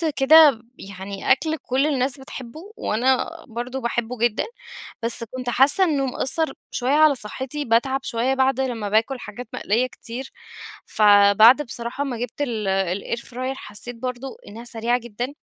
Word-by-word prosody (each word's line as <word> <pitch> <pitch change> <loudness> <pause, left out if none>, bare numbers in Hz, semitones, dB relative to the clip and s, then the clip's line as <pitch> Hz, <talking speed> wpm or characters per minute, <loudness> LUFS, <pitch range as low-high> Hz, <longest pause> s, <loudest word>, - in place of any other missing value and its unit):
كده 285 -3 +6 0.2
يعني 195 0 -5
أكل 315 +3 +2
كل 270 +1 0
الناس 270 -1 0
بتحبه 265 +2 -9 0.2
وأنا 255 +7 +1 0.2
برضو 245 +3 -5
باحبّه 235 +1 -2
جدًا، 235 0 +1 0.6
بس 230 +1 +1
كنت 250 +2 -6
حاسّة 280 +10 +5
إنّه 290 -6 +1
مأثر 270 +3 -1 0.2
شويّة 250 +1 -1
على 305 -2 +5
صحتي، 265 +6 -5
باتعب 260 +4 +1
شويّة 240 +3 0
بعده 265 0 +1
لمّا 225 -5 -4
باكل 225 +5 +1
حاجات 240 +2 -9
مقلية 235 +5 0
كتير، 250 +2 -8 0.5
فبعد 210 +5 +6
بصراحة 240 +1 -5
ما 260 -4 -4
جبت 245 +4 -5
ال 225 -7 -2 0.5
الair 240 - -8
fryer 255 +2 -5
حسّيت 240 +2 -8
برضو 250 +2 -5
إنّها 225 +3 -9
سريعة 240 +1 -1
جدًا، 240 +4 -5
245 Hz, 145 wpm, -22 LUFS, 230-270 Hz, 0.6 s, كده